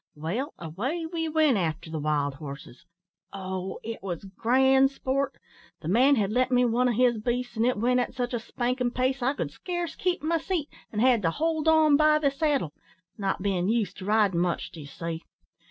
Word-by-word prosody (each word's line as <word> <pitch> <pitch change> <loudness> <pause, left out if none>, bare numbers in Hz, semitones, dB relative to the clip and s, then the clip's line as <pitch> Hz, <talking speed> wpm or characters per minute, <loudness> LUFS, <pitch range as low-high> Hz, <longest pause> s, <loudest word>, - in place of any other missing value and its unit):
Well, 180 - -3
away 230 - -3
we 325 -1 -3
went 310 -6 +3
after 165 -2 -2
the 160 - -3
wild 145 -1 0
horses. 140 -3 -10 0.4
Oh! 190 -1 -5
it 225 0 -6
was 185 -1 -5
grand 265 +4 +4
sport! 275 0 -1 0.5
The - - -7
man 255 +10 +5
had 210 -4 0
lent 255 +3 +2
me 250 0 +4
one 245 +2 +2
of 240 - +1
his 240 -1 +3
beasts, 240 0 -2
an' 225 +1 +1
it 250 -2 +1
went 250 +4 +2
at 245 - -2
such 245 0 -2
a 240 - 0
spankin' 245 +2 -1
pace, 255 +2 -1
I 265 +4 +1
could - - -3
scarce 350 -3 -4
keep 365 -2 -1
my 330 +1 +1
seat, 325 -3 -2 0.2
and 210 - -1
had 245 -3 +4
to 165 - +2
hold 320 - -1
on 315 -2 +5
by 305 0 +5
the 290 -2 +1
saddle 280 - 0 0.5
not 195 -1 -1
bein' 190 -2 0
used 215 -5 0
to 185 - -8
ridin' 205 -4 +3
much, 175 0 -1
d'ye 155 -3 -9
see. 165 +2 -5
245 Hz, 200 wpm, -27 LUFS, 190-275 Hz, 0.5 s, man